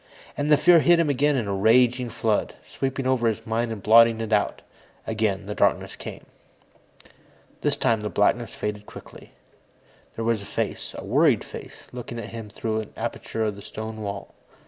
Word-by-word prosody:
And 145 +1 -1
the 150 - +7
fear 170 +3 +6
hit 170 +2 +5
him 160 -3 +2
again 145 +2 +2
in 120 -6 -1
a 100 - -1
raging 120 +4 +3
flood, 110 -1 -1
sweeping 135 0 -3
over 130 -3 +2
his 115 0 -2
mind 115 0 -1
and 105 -4 -6
blotting 115 +1 +6
it 110 -1 -2
out. 105 -1 0 0.4
Again, 110 -3 -1
the 105 - -4
darkness - - +1
came. - - -9 1.4
This - - 0
time, 115 -2 +1
the 105 - -3
blackness 115 +4 +1
faded 105 0 -4
quickly. - - -13 0.8
There 115 - -3
was 115 -2 +1
a - - -9
face, - - -4
a - - -7
worried - - +3
face, - - -11
looking 120 -1 -7
at 115 -1 -6
him 115 -2 -8
through 110 +1 -2
an 110 - -7
aperture 110 0 -3
in 105 - -1
the 100 - -11
stone 110 +1 -7
wall. 100 -1 -6
115 Hz, 185 wpm, -24 LUFS, 105-125 Hz, 1.4 s, the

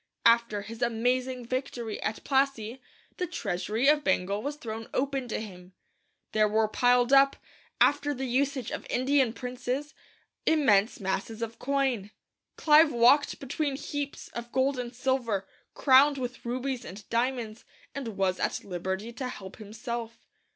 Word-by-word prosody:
After 230 -3 +4
his 225 +3 -9
amazing 250 +2 0
victory 240 -3 -4
at 215 - -3
Plassey, 265 -3 0 0.4
'the 360 - -2
treasury 215 - -1
of 295 0 +5
Bengal 200 -3 +1
was 285 +4 -3
thrown 225 -5 -6
open 270 -1 -1
to 230 - -2
him. 185 -4 -10 0.6
There 215 0 +3
were 215 +1 +2
piled 245 +3 +3
up, 275 0 +6 0.4
after 290 0 +3
the 265 -1 -3
usage 260 0 0
of - - -5
Indian 260 -1 +2
princes, 250 +4 -4 0.5
immense 245 -10 +3
masses 200 +3 -3
of 230 0 -6
coin. 265 -7 0 0.5
Clive 305 0 +6
walked 250 +5 +4
between 280 +1 -2
heaps 285 +1 -5
of 235 0 -7
gold 265 0 +1
and 245 0 -5
silver, 240 -6 -1 0.3
crowned 280 +1 +5
with 250 -1 -5
rubies 255 +1 -3
and 200 +3 -10
diamonds, 235 -2 -1 0.3
and 235 -7 -5
was 190 -1 +1
at - - -1
liberty 190 +4 -4
to 255 +2 -4
help 195 -6 -8
himself. 230 +2 -6
245 Hz, 145 wpm, -28 LUFS, 220-270 Hz, 0.6 s, up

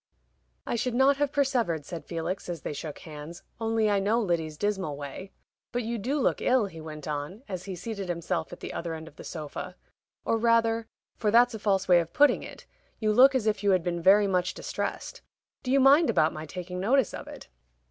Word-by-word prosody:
"I - - -2
should 245 +1 -1
not 270 +2 +4
have 290 -1 0
persevered," 245 - 0
said 165 -1 -7
Felix, 170 +3 -4
as 170 -4 -4
they - - -3
shook 150 +1 -6
hands, 155 +1 -10 0.2
"only 225 -1 +1
I 205 -1 +2
know 210 +4 +2
Lyddy's 165 -7 -1
dismal 190 -6 -1
way. 145 +7 -8 0.4
But 245 0 -1
you 230 +1 -3
do 270 +8 -1
look 260 - +1
ill," 250 -3 +3
he 165 -5 -9
went 155 -1 -8
on, 150 - -4
as 185 -3 -5
he 195 -2 -5
seated 195 +1 -5
himself 170 -1 -2
at - - -10
the - - -6
other 170 -1 -4
end 160 0 -9
of 155 - -14
the - - -9
sofa. 155 -3 -6 0.5
"Or 225 - +1
rather 230 -1 +2 0.3
for 215 - 0
that's 240 +3 +5
a 220 - -5
false 195 -2 +1
way 175 -1 +6
of 170 -1 -4
putting 290 0 +4
it - - -10 0.3
you 215 -1 +1
look 265 +4 +7
as 250 -5 +1
if 210 -2 +1
you 205 - +2
had 185 -3 +3
been 175 0 -2
very 200 +4 +6
much 185 -1 0
distressed. - - -4 0.4
Do 250 - -6
you 275 - +5
mind 280 +5 +6
about 165 -7 +3
my 155 +1 -7
taking 180 +2 -6
notice 240 +4 +2
of - - -7
it?" - - -10
195 Hz, 220 wpm, -28 LUFS, 170-230 Hz, 0.5 s, look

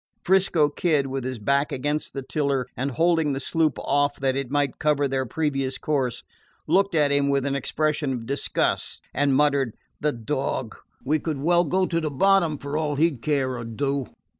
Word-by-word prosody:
'Frisco 180 -5 +3
Kid, 150 -1 +1
with 135 -1 -3
his 130 0 -4
back 140 +7 +1
against 145 +4 -2
the 135 - -3
tiller 140 -2 -1
and 135 +2 -2
holding 160 +2 +2
the 135 - -2
sloop 155 +3 +1
off 145 0 +1
that 135 -1 +1
it 135 -2 -2
might 145 -1 0
cover 145 -2 +2
their 130 -1 -1
previous 135 -2 -1
course, 135 -5 -1 0.4
looked 195 -2 +2
at 150 -2 +3
him 140 0 +2
with 140 -1 +1
an 140 - 0
expression 150 +1 -1
of 120 -3 -4
disgust, 140 +4 -1
and 140 -1 +2
muttered: 140 -4 +2 0.2
"The 150 - +1
dog! 120 -1 -3 0.3
We 155 +3 +2
could 155 -2 -3
well 170 +5 +3
go 185 +5 +1
to 165 -2 -1
the 155 - -1
bottom, 170 +1 +3
for 145 +2 -4
all 150 -2 -1
he 165 +4 +3
'd 130 -6 -11
care 135 -3 0
or 120 - -5
do!" 135 +3 -2
140 Hz, 190 wpm, -24 LUFS, 135-155 Hz, 0.4 s, Frisco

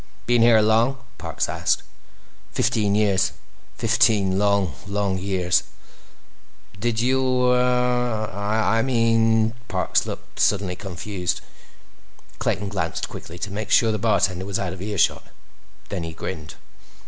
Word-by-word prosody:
"Been 120 -1 +3
here 115 -1 +6
long?" 115 +5 +3 0.2
Parks - - -2
asked. - - 0 0.7
"Fifteen 105 -2 +1
years. 100 -3 +2 0.4
Fifteen 100 -4 +3
long, 100 -5 +2
long 100 -1 -1
years." 90 -2 +1 1.2
"Did 115 +1 0
you—uh—I 125 -4 +1
mean—" 115 -2 +2
Parks 95 -2 0
looked - - -8
suddenly 95 -3 +2
confused. 95 -1 -4 1.0
Clayton 100 0 -1
glanced 85 -5 -3
quickly 85 - -9
to 100 +2 -5
make 105 +2 -4
sure 115 -2 +4
the 110 - -2
bartender 95 -3 +1
was 100 0 -2
out 90 -2 -3
of 95 - -9
earshot. 100 -1 0 0.6
Then 95 - -3
he 80 -1 -5
grinned. 80 0 -6
105 Hz, 115 wpm, -23 LUFS, 95-115 Hz, 1.2 s, here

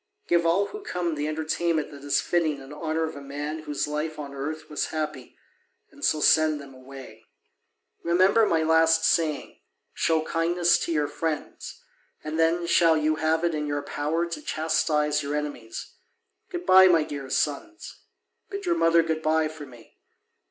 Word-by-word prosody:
Give 170 -1 +2
all 190 +5 +3
who 420 - -8
come 180 - -2
the 150 0 -2
entertainment 160 0 -1
that 140 -1 -12
is 145 - +1
fitting 160 -4 0
in 135 +1 -11
honour 160 +1 -2
of 160 - -4
a 140 - -8
man 145 +3 -5
whose 150 -1 -3
life 155 +1 -3
on 140 -2 -7
earth 155 +3 -5
was 150 - -2
happy, 155 -4 -5 0.5
and 285 - -15
so 155 - +2
send 155 -1 +4
them 140 -1 -12
away. 130 -4 -12 0.8
Remember 190 +6 +4
my 160 -1 +2
last 160 0 +4
saying: 155 -3 0 0.3
show 160 -1 +1
kindness 170 +2 +2
to - - -3
your 150 -2 +1
friends, 150 +1 -5 0.4
and 155 +1 -4
then 165 +1 +2
shall 165 -1 +4
you 155 0 +1
have 160 +1 +1
it 170 -1 +1
in 150 -1 -2
your 145 0 -2
power 160 +4 -1
to 170 -3 -6
chastise 150 -1 0
your 145 0 -3
enemies. 145 -7 -6 0.6
Good 355 -1 -5
bye, 190 0 +8
my 165 -4 +4
dear 140 -3 -7
sons, 150 - -3 0.5
bid 400 0 -6
your 345 - +2
mother 165 - +4
good 160 -1 -2
bye 155 0 +2
for 155 -2 -10
me. 120 -3 -17
155 Hz, 175 wpm, -26 LUFS, 150-165 Hz, 0.8 s, bye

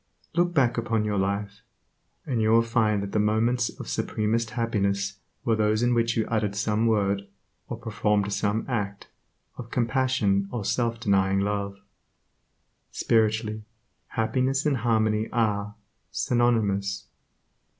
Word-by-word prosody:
Look 175 +1 +2
back 125 -5 +3
upon 115 -2 0
your 105 -2 0
life, 100 +1 -2 0.6
and 120 -5 -1
you 110 - +2
will 115 +1 +5
find 110 -3 +1
that 100 - -5
the 105 - +1
moments 115 +3 +2
of - - -7
supremest 110 +1 -1
happiness 100 -4 -1 0.3
were 115 - +3
those 110 +1 +1
in 120 0 +3
which 115 -1 +1
you 110 - +2
uttered 105 -3 -1
some 110 +2 +1
word, 100 -2 +1 0.4
or - - -5
performed 105 -2 0
some 105 +2 0
act, 100 -5 -3 0.5
of 120 -2 -7
compassion 120 -6 +1
or 115 -5 -3
self 115 +1 0
denying 95 -2 +2
love. 100 -1 -2 1.1
Spiritually, 110 -1 +1 0.5
happiness 130 +5 0
and 145 -3 +2
harmony 110 -2 +1
are, 105 -3 0 0.3
synonymous. 105 -4 +1
110 Hz, 130 wpm, -26 LUFS, 100-115 Hz, 1.1 s, will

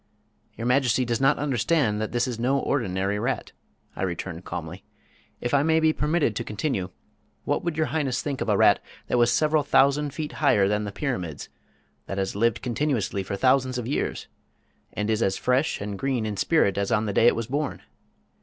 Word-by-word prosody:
"Your 115 - -4
Majesty 125 0 +2
does 120 +1 -1
not 135 +2 +4
understand 125 -4 +1
that 110 - -3
this 120 +1 0
is 120 -3 -4
no 130 +4 +2
ordinary 100 -7 -1
rat," - - -2 0.4
I - - -6
returned 90 -1 -4
calmly. - - -6 0.6
"If 120 - -3
I 140 - +5
may 160 +2 +3
be 160 0 +3
permitted 150 -7 0
to - - -2
continue, 105 -4 -2 0.5
what - - -1
would 170 -2 -2
Your 155 - +2
Highness 145 -6 -1
think 140 -3 -3
of - - -1
a - - +3
rat - - +5 0.3
that 125 - +2
was 120 0 +4
several 155 +3 +2
thousand 145 +1 +3
feet 150 +1 -5
higher 105 -10 +4
than 105 +1 0
the 100 - -4
pyramids, 95 - -4 0.6
that 95 - -4
has 95 0 -2
lived 110 +1 +1
continuously 120 -6 -1
for 95 +1 -4
thousands 130 +2 +2
of 120 - -3
years, 135 - -2 0.7
and 105 - -3
is 110 0 0
as 95 -2 +1
fresh 130 +5 +1
and 100 -1 -5
green 130 -5 -1
in 105 -1 -3
spirit 100 - +2
as 100 - -1
on 105 - +2
the 105 - -2
day 115 - +5
it - - +5
was 115 - -2
born? 145 +5 -3
120 Hz, 200 wpm, -25 LUFS, 105-140 Hz, 0.7 s, I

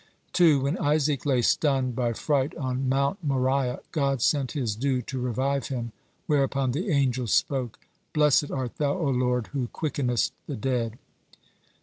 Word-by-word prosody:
2. 160 -6 +5
When 140 +6 -1
Isaac 145 -1 +1
lay 130 -4 +2
stunned 130 -2 +2
by 120 -1 0
fright 140 +3 0
on 130 -2 -2
Mount 140 +7 0
Moriah, 130 -2 0
God 140 -4 0
sent 135 +2 +1
His 120 -9 -1
dew 130 +2 0
to 130 +3 -5
revive 130 +3 -1
him, 120 -3 -4 0.3
whereupon 135 -2 +1
the 175 - -2
angels 130 - +1
spoke: 130 -5 0 0.3
"Blessed 150 -1 +3
art 130 -3 -4
Thou, 145 +2 0
O 155 -6 0
Lord, 125 -2 0
who 130 -4 -1
quickenest 125 -5 -1 0.2
the - - -3
dead." 115 -1 -2
135 Hz, 150 wpm, -26 LUFS, 125-145 Hz, 0.3 s, 2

